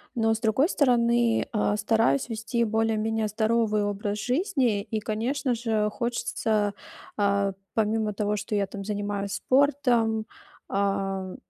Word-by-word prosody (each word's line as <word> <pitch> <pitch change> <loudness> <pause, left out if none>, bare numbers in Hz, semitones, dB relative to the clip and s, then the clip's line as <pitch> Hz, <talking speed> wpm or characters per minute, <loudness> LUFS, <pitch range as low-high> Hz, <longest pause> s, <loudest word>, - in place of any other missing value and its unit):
но, 225 -1 +2
с 220 - -3
другой 240 - +2
стороны, 235 - +2
а, 210 -2 +1
стараюсь 215 - +2
вести 230 +1 -1
более-менее 220 0 0
здоровый 215 0 +1
образ 205 0 -2
жизни 250 - +1
и, 220 +1 -3
конечно 240 +5 -1
же, 220 -2 0
хочется, 220 -3 -1 0.4
а, 200 -1 +1 0.2
помимо 220 -1 0
того, 210 0 -1
что 210 +1 -3
я, 200 -1 +1
там, 195 0 -7
занимаюсь 205 -1 -3
спортом, 250 -5 +2 0.4
а, 195 -1 0
м, 185 -1 -7
220 Hz, 130 wpm, -26 LUFS, 205-235 Hz, 0.4 s, но